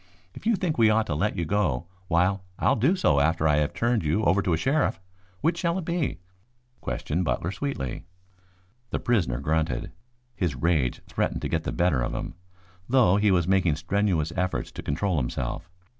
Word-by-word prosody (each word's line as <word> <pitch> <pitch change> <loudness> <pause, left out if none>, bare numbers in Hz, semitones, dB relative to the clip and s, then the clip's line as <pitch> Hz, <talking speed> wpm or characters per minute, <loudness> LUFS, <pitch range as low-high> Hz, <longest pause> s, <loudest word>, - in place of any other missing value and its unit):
If - - -7
you 230 - +4
think 175 -7 -2
we 110 -1 +6
ought 110 0 +3
to 75 - -2
let 75 - 0
you 85 - -1
go, 85 -7 0 0.2
why 90 +3 +2 0.2
I'll - - +3
do 135 - +3
so 75 - +3
after 80 +2 +2
I 75 -1 +3
have 75 0 +1
turned 115 -3 0
you 80 +8 +1
over 100 -1 +3
to 90 - 0
a - - +2
sheriff. 135 - +1 0.4
Which 165 +2 +1
shall 170 0 0
it 185 - -4
be?" 170 -4 -1 0.6
questioned 85 +5 -2
Butler 85 +1 -1
sweetly. 95 - -4 0.8
The - - -1
prisoner 95 - +1
grunted. 80 -6 -1 0.4
His 85 -7 -1
rage 75 -4 +1
threatened - - -2
to - - -1
get - - -1
the - - -1
better 70 +1 +1
of - - -2
him, - - -4 0.6
though 120 -7 +5
he 105 0 +3
was 90 -3 +2
making 95 -5 +3
strenuous 85 -1 0
efforts 90 -9 -1
to - - -7
control 85 +4 -1
himself. 75 +6 -3
90 Hz, 190 wpm, -26 LUFS, 80-110 Hz, 0.8 s, we